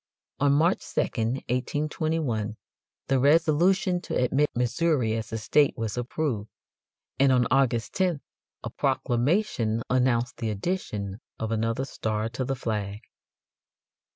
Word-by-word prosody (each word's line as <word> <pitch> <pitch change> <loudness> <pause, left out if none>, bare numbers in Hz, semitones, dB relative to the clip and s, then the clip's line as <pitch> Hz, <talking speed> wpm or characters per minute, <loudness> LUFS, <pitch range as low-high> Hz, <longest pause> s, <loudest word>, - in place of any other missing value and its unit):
On 140 0 +4
March 165 +6 +2
2, - - +3
1821, 125 0 -1 0.5
the 135 0 +2
resolution 170 +5 +3
to - - -5
admit 135 +4 +2
Missouri 125 0 +1
as 110 -1 -4
a 110 - -2
state 140 +6 +2
was 110 -2 -3
approved, 120 -3 -2 0.7
and 135 0 +5
on 125 -2 +4
August 125 -5 +2
10th 180 -6 0 0.4
a - - -5
proclamation 120 - 0
announced 125 -1 +1
the 115 -2 -2
addition 105 - -3 0.2
of 110 0 -3
another 115 +3 0
star 110 -4 -2
to 130 +3 -3
the 135 +1 -1
flag. 105 -3 -3
125 Hz, 125 wpm, -26 LUFS, 110-150 Hz, 0.7 s, and